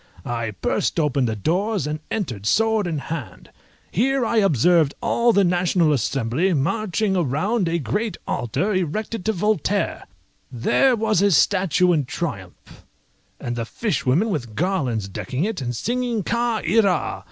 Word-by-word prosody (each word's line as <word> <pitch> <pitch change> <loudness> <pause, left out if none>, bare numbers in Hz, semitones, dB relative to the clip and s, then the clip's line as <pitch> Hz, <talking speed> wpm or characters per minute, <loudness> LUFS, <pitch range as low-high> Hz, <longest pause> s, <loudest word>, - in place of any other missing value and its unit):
I 115 -2 -2
burst - - 0
open 140 -4 +1
the 110 -2 -1
doors, 185 - 0
and 150 +1 -3
entered 120 - -3
sword 220 - +2
in 165 -3 -2
hand. 145 -2 -7 0.4
Here 260 +5 +1
I 230 - 0
observed 170 - +3
all 235 0 +2
the 200 -3 +3
National 175 -3 +2
Assembly 135 - 0
marching 200 +6 0
round 180 - 0
a 170 - 0
great 170 - -2
altar 180 - -1
erected 185 +4 -2
to 220 - +2
Voltaire; 205 -1 -1 0.4
there 245 - +2
was 215 -4 +1
his 200 -4 +4
statue 185 -2 +3
in 150 -4 +1
triumph, 110 - -7 0.6
and 120 - -4
the 115 - -2
fishwomen 185 - 0
with 120 - -4
garlands 135 - -1
decking 125 - -4
it, 210 -5 -2
and 120 -1 -3
singing 240 - -1
"Ca 235 0 -1
ira!" 195 -2 +2
180 Hz, 145 wpm, -22 LUFS, 135-215 Hz, 0.6 s, his